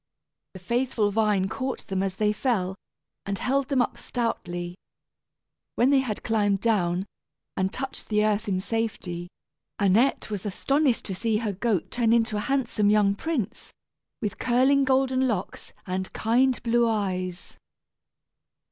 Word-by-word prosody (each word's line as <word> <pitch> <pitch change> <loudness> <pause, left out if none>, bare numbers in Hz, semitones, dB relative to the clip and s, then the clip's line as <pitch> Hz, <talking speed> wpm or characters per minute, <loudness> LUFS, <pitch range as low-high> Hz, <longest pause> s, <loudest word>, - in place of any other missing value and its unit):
The - - -7
faithful 235 +1 0
vine 205 -3 +2
caught 260 +5 -4
them 190 -1 -2
as 195 -1 -2
they 210 +1 +1
fell, 210 -6 0 0.5
and 200 0 -1
held 270 +5 0
them 270 -3 +3
up - - -5
stoutly. 175 -7 -3 1.0
When 255 +3 +4
they 275 - +5
had 240 -6 -3
climbed 205 -3 +1
down, 185 -5 +1 0.5
and 190 0 0
touched 270 0 -5
the 210 -1 +3
earth 215 +1 0
in 185 -2 0
safety, 190 -6 -3 0.5
Annette 215 +5 +2
was 205 -3 -3
astonished 270 +6 +1
to 195 - -3
see 220 +3 0
her 215 -2 -2
goat 200 -2 -1
turn 230 -2 +2
into 225 -1 +2
a 210 - -3
handsome 250 -6 +2
young 205 -1 +4
prince, 235 - -3 0.5
with 210 - -3
curling 265 +3 +3
golden 260 0 +2
locks 205 -6 -4
and 185 0 -3
kind 250 +3 +2
blue 235 0 +3
eyes. 185 -4 -2
215 Hz, 145 wpm, -26 LUFS, 195-245 Hz, 1.0 s, they